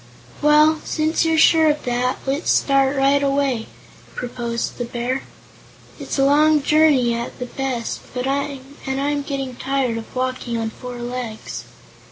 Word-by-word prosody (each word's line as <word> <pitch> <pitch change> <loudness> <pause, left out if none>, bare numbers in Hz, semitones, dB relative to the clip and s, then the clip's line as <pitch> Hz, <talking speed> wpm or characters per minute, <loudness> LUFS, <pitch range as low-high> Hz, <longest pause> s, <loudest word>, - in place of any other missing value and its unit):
"Well, 300 +1 +5
since 315 +1 0
you're 325 0 +2
sure 320 0 +6
of 295 0 -1
that, 250 +1 0
let's 275 +5 -1
start 275 0 +3
right 275 +1 +3
away," 275 -4 0 0.5
proposed 240 -1 -4
the - - 0
Bear. 245 +3 -2 0.8
"It's - - -4
a 270 - +4
long 300 +1 +4
journey, 290 -6 +4
at 235 +1 -4
the 250 - -4
best, 250 -2 -3 0.2
and 270 +1 -3
I'm 285 +1 0
getting 275 -3 -4
tired 265 -4 -1
of 225 - -12
walking 255 -2 -2
on 225 -1 -2
four 250 +1 -8
legs." 240 -2 -5
270 Hz, 145 wpm, -21 LUFS, 245-285 Hz, 0.8 s, sure